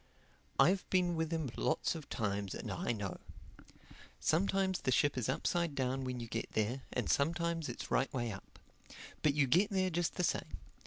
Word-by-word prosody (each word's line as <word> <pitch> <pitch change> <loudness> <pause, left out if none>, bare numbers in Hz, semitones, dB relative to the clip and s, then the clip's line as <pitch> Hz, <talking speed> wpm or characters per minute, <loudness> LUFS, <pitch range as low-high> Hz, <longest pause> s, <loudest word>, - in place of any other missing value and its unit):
I've 180 +7 +4
been 180 -2 +2
with 160 0 -1
him 160 -6 -1
lots 160 - +1
of 160 -4 -8
times 100 -4 -2
and - - -5
I - - -1
know. 100 -5 -4 1.0
Sometimes 190 +3 +2
the 130 - +1
ship 145 +3 +3
is 125 -1 -1
upside 170 +3 0
down 130 0 -1
when 125 -1 -3
you 120 - -4
get 115 0 -4
there, 110 +5 0
and 125 -4 -1
sometimes 165 +1 +1
it's 120 - -6
right 135 - +2
way 120 -3 -1
up. 95 - -10 0.6
But 145 -2 +3
you 150 -2 +4
get 180 +11 +4
there 190 -2 +1
just 175 0 0
the 180 - 0
same. - - -1
145 Hz, 180 wpm, -35 LUFS, 125-170 Hz, 1.0 s, I've